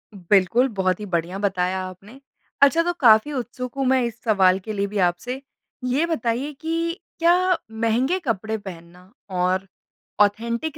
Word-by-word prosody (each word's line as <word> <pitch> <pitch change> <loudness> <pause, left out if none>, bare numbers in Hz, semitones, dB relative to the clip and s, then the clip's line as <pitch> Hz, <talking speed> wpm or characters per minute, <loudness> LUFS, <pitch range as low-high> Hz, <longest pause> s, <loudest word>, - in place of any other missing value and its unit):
बिल्कुल, 200 +7 +3
बहुत 190 -2 0
ही 210 - -5
बढ़िया 175 0 -2
बताया 190 -2 0
आपने। 200 +8 -13 0.4
अच्छा 305 +4 +6
तो 350 0 0
काफ़ी 230 +3 +5
उत्सुक 250 0 -5
हूँ 270 - 0
मैं 260 0 +3
इस 235 -1 -5
सवाल 190 -4 +3
के 215 +3 -6
लिए 200 0 -1
भी 205 +1 -5
आपसे 245 +10 -4 0.4
ये 265 +6 +1
बताइए 265 -2 -2
कि 330 +2 -2 0.2
क्या 355 +1 +3
महँगे 235 +10 0
कपड़े 220 - -2
पहनना 180 -1 -12 0.2
और 185 +1 0 0.5
ऑथेंटिक 235 +8 0
220 Hz, 150 wpm, -23 LUFS, 190-270 Hz, 0.5 s, अच्छा